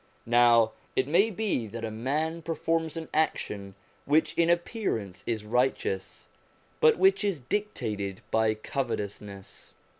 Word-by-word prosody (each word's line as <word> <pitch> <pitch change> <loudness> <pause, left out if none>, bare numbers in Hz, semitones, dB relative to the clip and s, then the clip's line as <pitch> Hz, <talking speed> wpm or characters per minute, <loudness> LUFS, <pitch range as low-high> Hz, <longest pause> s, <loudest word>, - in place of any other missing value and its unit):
Now 120 -1 +5 0.2
it 130 - +1
may 185 +9 +4
be 200 - -1
that 115 +2 -5
a 110 - -4
man 150 +9 -2
performs 165 0 -1
an 160 -1 -5
action 100 -10 -1 0.3
which 150 +3 +2
in 170 0 +2
appearance 170 - -1
is 110 -3 -2
righteous, 115 -5 -1 0.5
but 465 -1 +5
which 385 - +4
is 200 -5 0
dictated 110 - -3
by 110 -1 +2
covetousness. 105 -5 -5
125 Hz, 125 wpm, -28 LUFS, 110-165 Hz, 0.5 s, Now